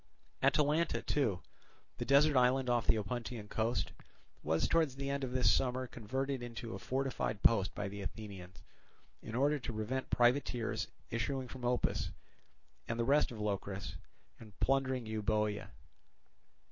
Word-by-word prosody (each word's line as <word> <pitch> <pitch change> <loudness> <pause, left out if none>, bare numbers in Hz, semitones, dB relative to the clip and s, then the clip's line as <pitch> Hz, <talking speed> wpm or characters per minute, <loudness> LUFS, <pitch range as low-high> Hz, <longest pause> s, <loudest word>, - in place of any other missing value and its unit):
Atalanta 150 +3 +3
also, 110 -11 +1 0.6
the - - -2
desert 145 +2 +5
island 125 0 +4
off 120 -2 +1
the - - +5
Opuntian 110 +1 -4
coast, 115 +3 0 0.5
was 80 +1 +1
towards 160 -5 +2
the 140 0 -3
end 140 0 -2
of 130 - -2
this 130 0 +4
summer 130 0 +1
converted 130 +3 -3
into 115 -1 -6
a - - -5
fortified 130 -5 -2
post 100 -4 +4
by 105 - -2
the 100 +1 -6
Athenians, 95 -3 -8 0.6
in 110 - -6
order 145 +3 +3
to 125 - -4
prevent 115 +5 -2
privateers 120 -3 +2 0.2
issuing 130 +3 -1
from 125 +1 -9
Opus 125 0 +1 0.8
and 115 0 -2
the - - +3
rest 145 +4 +4
of 115 - -7
Locris 100 -1 -3 0.5
and 105 -3 -14
plundering 130 -2 +1
Euboea. 105 -1 0
120 Hz, 145 wpm, -34 LUFS, 105-135 Hz, 0.8 s, desert